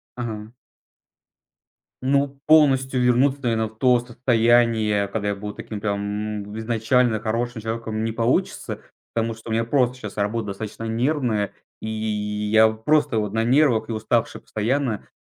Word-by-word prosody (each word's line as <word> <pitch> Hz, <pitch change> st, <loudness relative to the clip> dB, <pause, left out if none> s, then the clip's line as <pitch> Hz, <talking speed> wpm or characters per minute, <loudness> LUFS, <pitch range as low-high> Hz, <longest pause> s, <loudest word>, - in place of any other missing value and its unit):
Ага. 110 Hz, -2 st, -6 dB, 1.5 s
Ну, 140 Hz, +1 st, +1 dB
полностью 135 Hz, -4 st, +4 dB
вернуться, 130 Hz, +3 st, +3 dB
наверное, 110 Hz, -2 st, +1 dB
в 110 Hz, 0 st, -17 dB
то 125 Hz, -1 st, +4 dB
состояние, 115 Hz, -3 st, +2 dB
когда 105 Hz, 0 st, -2 dB
я 100 Hz, -, -1 dB
был 105 Hz, +1 st, -6 dB
таким 105 Hz, -, -7 dB
прям 105 Hz, 0 st, -3 dB
изначально 115 Hz, +1 st, +1 dB
хорошим 115 Hz, +2 st, -2 dB
человеком, 110 Hz, -1 st, -3 dB
не 115 Hz, -, -1 dB
получится. 115 Hz, +2 st, -1 dB, 0.3 s
Потому 115 Hz, 0 st, -1 dB
что 110 Hz, +1 st, -11 dB
у -, -, -1 dB
меня 115 Hz, -, +1 dB
просто 125 Hz, +1 st, +1 dB
щас 110 Hz, -4 st, -8 dB
работа 105 Hz, +2 st, -1 dB
достаточно 105 Hz, +2 st, -6 dB
нервная, 115 Hz, -2 st, 0 dB, 0.3 s
и 110 Hz, -, -4 dB, 0.6 s
я 110 Hz, 0 st, +7 dB
просто 115 Hz, +3 st, +1 dB
вот 105 Hz, -2 st, -1 dB
на 115 Hz, 0 st, +1 dB
нервах 130 Hz, -3 st, +3 dB
и -, -, -2 dB
уставший 110 Hz, -, -1 dB
постоянно. 120 Hz, +1 st, -2 dB
115 Hz, 140 wpm, -23 LUFS, 110-125 Hz, 1.5 s, я